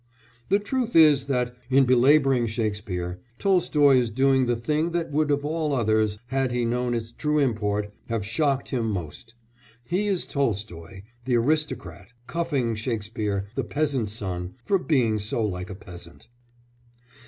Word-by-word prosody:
The 200 - +5
truth 240 +3 -2
is 150 -4 +6
that, 125 -2 -1
in 135 0 +5
belabouring 130 0 +4
Shakespeare, 100 -6 -3 0.2
Tolstoy 150 -8 +4
is 120 -2 +1
doing 130 +2 +2
the 120 - +2
thing 150 +8 -1
that 170 -2 -2
would 150 +1 +1
of 145 0 +1
all 155 -1 -1
others, 110 -3 +1
had 135 -1 0
he 120 -1 0
known 120 +1 0
its 115 0 -4
true 150 +4 -1
import, 105 -6 0 0.2
have 115 -3 -2
shocked 135 +5 0
him 120 -4 -1
most: 100 +5 -6 0.5
he 190 +4 0
is 195 -3 0
Tolstoy 100 - -3 0.2
the 125 -1 +1
aristocrat 115 - -1 0.2
cuffing 145 -8 -1
Shakespeare 105 -3 -3
the - - -2
peasant's 140 -8 -1
son 90 -3 -4
for 195 - +2
being 120 -11 +1
so 110 +2 -1
like 90 -2 -4
a 95 - -6
peasant. 85 -3 -12
120 Hz, 150 wpm, -25 LUFS, 105-145 Hz, 0.5 s, is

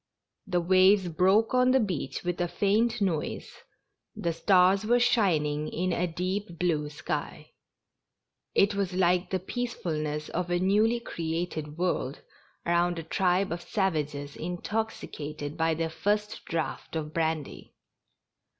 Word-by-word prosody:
The 180 -2 +1
waves 185 +1 +5
broke 190 +8 +3
on 250 0 +4
the 265 +1 +5
beach 185 - -2
with 175 0 -2
a 175 - +1
faint 215 +5 +1
noise, 170 -6 -1 0.6
the 170 -1 -1
stars 185 +3 +4
were 240 +3 +3
shining 155 -11 +2
in 180 +2 -1
a 180 +1 0
deep 180 +2 -3
blue 155 -4 0
sky 150 - -5 0.5
— - - -56
it 205 - -5
was 200 -2 -1
like 180 0 +2
the 190 - 0
peace 240 +6 -4
fulness 150 -2 -3
of 180 0 -2
a 175 - +2
newly 210 +6 +3
created 165 -6 -4
world 170 -6 -1 0.4
around 175 0 +2
a 165 - -4
tribe 185 +3 +1
of 170 +1 -3
sav 190 -3 0
ages 145 -1 -4
intoxicated 165 -5 -4
by 165 -1 +1
their 165 0 -2
first 210 +4 -1
draught 165 0 -3
of 155 -1 -3
brandy. 160 -3 -2
175 Hz, 140 wpm, -28 LUFS, 160-200 Hz, 0.6 s, waves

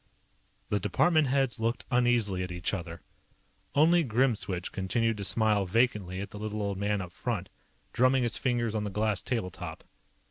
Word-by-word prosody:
The 105 - +1
department 155 - +3
heads 135 -3 +1
looked 115 +2 -1
uneasily 120 -6 +2
at 90 -1 -4
each 90 +2 -3
other. 85 -3 -5 0.7
Only 165 +4 +5
Grimswitch 110 - 0
continued 115 +4 0
to 100 - -4
smile 105 -1 +2
vacantly 105 -4 +1
at 100 - -6
the 105 - -8
little 105 0 -3
old 100 -1 -2
man 100 0 0
up 90 -2 -7
front, 100 -1 -3 0.4
drumming 130 +1 +3
his 120 -1 0
fingers 120 -4 0
on 110 -1 -1
the 105 - -2
glass 105 0 0
table 115 -7 -2
top. - - -8
110 Hz, 170 wpm, -29 LUFS, 95-120 Hz, 0.7 s, Only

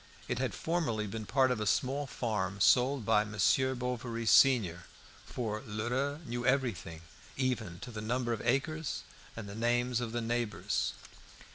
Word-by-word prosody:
It - - -2
had 125 -7 -1
formerly 120 - -1
been 110 +1 -5
part 130 0 +3
of 125 - 0
a 105 - -1
small 135 +7 +1
farm 105 -6 -2
sold 125 +3 +4
by 105 -1 +4
Monsieur 110 +5 +2
Bovary 120 -2 -3
senior; 110 -6 +5 0.4
for 110 -3 -3
Lheureux 125 +8 -2
knew 120 0 -3
everything, 120 - 0 0.4
even 115 -10 -1
to 125 - -7
the 110 -2 -6
number 120 +2 -1
of 115 - -4
acres 140 +5 -1 0.3
and 110 -2 -6
the 100 - -7
names 120 +2 +1
of 120 -2 -3
the 120 - -1
neighbours. 115 -2 -1
120 Hz, 155 wpm, -32 LUFS, 110-130 Hz, 0.4 s, senior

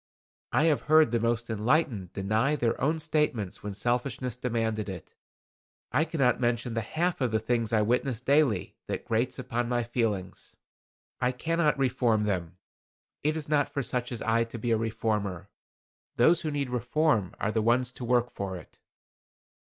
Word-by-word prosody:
I - - +3
have 160 -3 +3
heard 155 -5 +6
the 120 - +2
most 115 0 0
enlightened 110 - 0
deny 110 +9 +1
their 120 -5 -1
own 155 +5 +2
statements 150 - -1
when 100 -1 -5
selfishness 120 +2 -1
demanded 115 -4 -1
it. 90 -4 -8 0.8
I 155 - +2
cannot 140 -7 +1
mention 120 0 0
the 115 - 0
half 165 +9 -1
of 125 - +2
the 110 - +1
things 115 +1 -1
I 110 -2 +3
witness 125 +1 0
daily 135 - +2
that - - -4
grates 120 +3 0
upon 120 -2 -2
my 120 -1 +1
feelings. 115 -6 -3 0.6
I 125 0 +2
cannot 155 +3 +1
reform 120 -5 +2
them. 90 -4 -2 0.6
It 155 +2 0
is 155 - -4
not 145 -1 +2
for 140 - -2
such 125 0 -2
as 120 - -4
I 115 +1 +2
to 115 +1 -8
be 115 +1 -2
a - - +5
reformer. 105 -4 -2 0.7
Those 160 +8 +4
who 155 - -2
need 140 -3 -2
reform 125 - +1
are 110 - 0
the 110 - +1
ones 120 +3 +2
to 125 - -9
work 120 0 +2
for 95 -2 -4
it." - - -15
120 Hz, 170 wpm, -28 LUFS, 110-135 Hz, 0.8 s, heard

